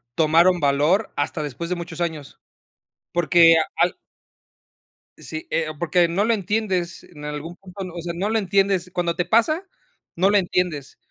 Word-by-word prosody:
tomaron 170 +3 +4
valor 150 +9 +2
hasta 145 +2 -2
después 150 +4 -5
de 180 - 0
muchos 170 -1 -7
años. 160 -5 -4 0.7
Porque 170 0 +5
a - - +3 0.2
al - - -8 1.2
sí, 155 0 -7
eh, 165 -1 0
porque 170 +2 +2
no 175 +5 0
lo 230 +2 +2
entiendes 190 -4 -2
en 150 -3 -12
algún 150 +3 -6
punto. 195 +1 -11
O 170 - -6
sea, 170 0 -4
no 195 +4 -1
lo 225 - +1
entiendes 195 -2 +1
cuando 175 -1 -1
te 180 - -1
pasa, 235 - +2 0.5
no 185 +3 +3
lo 205 - +4
entiendes. 175 -7 -1
175 Hz, 160 wpm, -22 LUFS, 160-190 Hz, 1.2 s, Porque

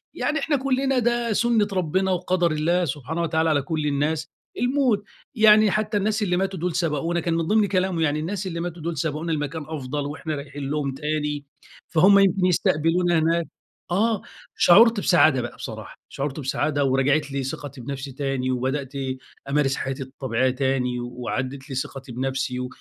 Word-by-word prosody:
يعني 310 - 0
إحنا 300 0 0
كُلّنا 265 0 +1
ده 240 -1 +1
سُنّة 225 -1 +2
ربنا 185 +2 0
وقدَر 180 -1 +1
الله 170 +4 +1
سبحانه 150 +3 -3
وتعالى 160 -1 +1
على 145 -2 +2
كل 155 0 -2
الناس 150 +2 0 0.3
الموت، 250 -5 +2 0.3
يعني 215 -2 +6
حتى 215 +1 0
الناس 215 +2 0
اللي 180 -2 +1
ماتوا 190 -1 -1
دول 175 0 -2
سبقونا، 165 +1 0
كان 170 0 -1
من 165 -1 -1
ضِمن 215 0 +3
كلامه 185 -2 0
يعني 150 -1 +1
الناس 190 +5 -3
اللي 170 -2 -4
ماتوا 175 -1 -5
دول 170 -1 -3
سبقونا 155 +2 -2
لمكان 150 +1 -2
أفضَل 145 -2 -4
وإحنا 155 +1 -4
رايحين 140 -1 -6
لهم 145 -2 -1
تاني، 150 0 -2 0.4
فهُم 195 +5 +6
يمكن 195 -1 +3
يستقبلونا 170 0 +2
هناك. 165 +1 +1 0.5
آه، 215 +3 +2 0.4
شعُرت 225 +4 +6
بسعادة 155 -9 +4
بقى 120 - -6
بصراحة، - - -8
شعُرت 140 +1 -4
بسعادة 145 +1 0
ورجَعِت 135 +2 +2
لي 135 -1 -2
ثقتي 135 0 -6
بنفْسي 135 +2 -5
تاني 135 -1 -2
وبدأت 130 +2 -2 0.6
أمارس 140 -1 +2
حياتي 135 0 -3
الطبيعية 130 -1 -1
تاني 130 -2 0
وعادت 130 +3 -4
لي 135 - -5
ثقتي 130 0 -5
بنفْسي 130 0 -2
155 Hz, 165 wpm, -24 LUFS, 140-185 Hz, 0.6 s, يعني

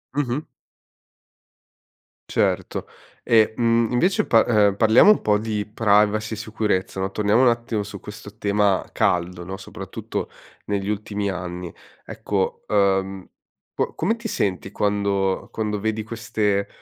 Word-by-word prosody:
Mh-mh. 140 -1 0 1.9
Certo. - - 0 0.4
E, 110 -1 +4
mhmm, 115 -1 +2
invece 180 +11 +2
pa 115 -1 +5
uhm, 105 -4 +4
parliamo 110 - +6
un 215 - +6
po' 105 -1 +2
di 105 -1 -2
privacy 105 0 +2
e - - -11
sicurezza, 105 -4 -2
no? 95 0 -1
Torniamo 105 +4 +2
un 130 - +5
attimo 115 -2 0
su 100 -1 -7
questo 105 0 -11
tema 100 -2 +1
caldo, 90 0 0
no, 95 +2 -6
soprattutto 95 - -6 0.4
negli 100 -1 -2
ultimi 105 -1 -2
anni. 90 -1 -6 0.3
Ecco, 95 -2 -3
ehm, 95 -2 +1 0.5
qua - - -2
come 215 +8 0
ti 230 0 -6
senti 95 - -2
quando 100 -2 0
quando 105 -2 -2
vedi 110 +1 -2
queste, 105 -3 -1
105 Hz, 130 wpm, -23 LUFS, 100-110 Hz, 1.9 s, parliamo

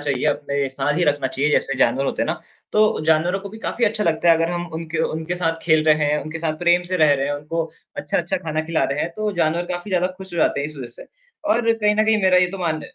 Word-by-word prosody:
चाहिए, 140 -3 -2
अपने 140 -1 -1
साथ 135 +2 -1
ही 175 - +2
रखना 145 -3 +1
चाहिए। 140 +3 -1
जैसे 140 - +2
जानवर 130 +4 +2
होते - - -1
हैं - - -1
ना, - - -3 0.3
तो 215 0 +3
जानवरों 160 +4 +2
को 200 - -8
भी 220 +3 -11
काफ़ी 235 +1 -1
अच्छा 210 0 0
लगता 165 +1 +1
है 165 - +8
अगर 165 +1 0
हम 175 0 -3
उनके 160 0 -4 0.2
उनके 160 +2 -3
साथ 165 -2 -1
खेल 155 -2 +3
रहे 155 -1 +6
हैं, 150 +1 +1
उनके 155 +3 -6
साथ 160 -1 -1
प्रेम 175 +1 +3
से 185 - +1
रह 155 -4 +5
रहे 135 -1 0
हैं, 145 - -1
उनको 150 +3 -3 0.3
अच्छा-अच्छा 170 +4 -1
खाना 160 -3 -2
खिला 165 - +2
रहे 145 - -2
हैं, 170 - -1
तो 215 0 -1
जानवर 165 +2 +1
काफ़ी 175 +3 -6
ज़्यादा 180 -1 +2
खुश 190 -1 -11
हो - - -3
जाते 140 - +2
हैं 140 - -2
इस 155 - -12
वज़ह 130 -3 -6
से। - - -12 0.5
और 230 -1 +2
कहीं 210 -2 +1
न 215 - +3
कहीं 215 -1 +2
मेरा 185 -1 +5
ये 180 - +4
तो - - -11
मान 160 -3 -1
165 Hz, 275 wpm, -21 LUFS, 150-180 Hz, 0.5 s, है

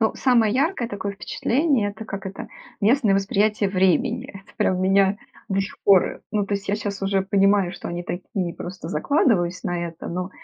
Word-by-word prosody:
Ну, 220 - +2
самое 235 -5 +3
яркое 275 -3 0
такое 200 -1 -4
впечатление- 240 +2 0
это 220 +2 -9
как 200 -2 -6
это 195 - -7 0.3
местное 220 -1 +3
восприятие 205 +1 +1
времени. 195 +6 +1
Это 195 0 -14
прям 185 -1 +1
меня, 195 +1 +3 0.3
до 195 0 +1
сих 195 - -5
пор. 195 -2 +4
Ну 205 -2 0
то 200 - -1
есть 200 0 -5
я 200 - +2
щас 205 -1 -4
уже 195 0 +1
понимаю, 195 -1 +3
что 180 - -7
они 175 +1 -4
такие 180 -1 -4
просто 175 -2 -7
закладываюсь, 185 - +1
на 175 -1 -1
это, 165 -1 -9
ну, 180 +2 -4
200 Hz, 185 wpm, -23 LUFS, 185-215 Hz, 0.3 s, пор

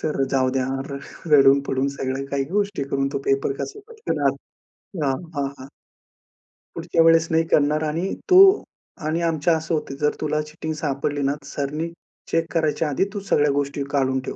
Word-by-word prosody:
Sir 150 -3 -1
जाऊद्या 130 -1 +1 0.2
र 140 - -4 0.3
रडून 140 -1 +7
पडून 135 +1 0
सगळ्या 130 +1 -2
काही 140 -1 0
गोष्टी 200 -6 0
करून 135 0 0
तो - - -1
पेपर 135 0 +1
कसा 420 - -5
पटकन 460 -1 -4
आ - - +5 0.7
हां, 135 -1 +1 0.2
हां, 140 -1 -1
हां. 130 - -10 1.1
पुढच्या 165 0 +1
वेळेस 165 0 +5
नाही 165 0 +3
करणार 150 0 +2
आणि 165 +5 -2 0.2
तो 370 0 +8 0.7
आणि 160 +2 0
आमचं 165 -1 +1
असं 160 +2 -4
होतं, 150 -3 -2
जर 150 0 +2
तुला 150 0 0
चीटिंग 155 +1 -6
सापडली 145 -1 -2
ना, 140 0 +1
सरांनी 145 +3 -3 0.4
चेक 165 0 0
करायच्या 160 -1 +1
आधी 145 - +1
तू 205 - -3
सगळ्या 145 0 +3
गोष्टी 140 0 -1
काढून 130 -2 +1
ठेव. - - -6
150 Hz, 170 wpm, -23 LUFS, 140-165 Hz, 1.1 s, तो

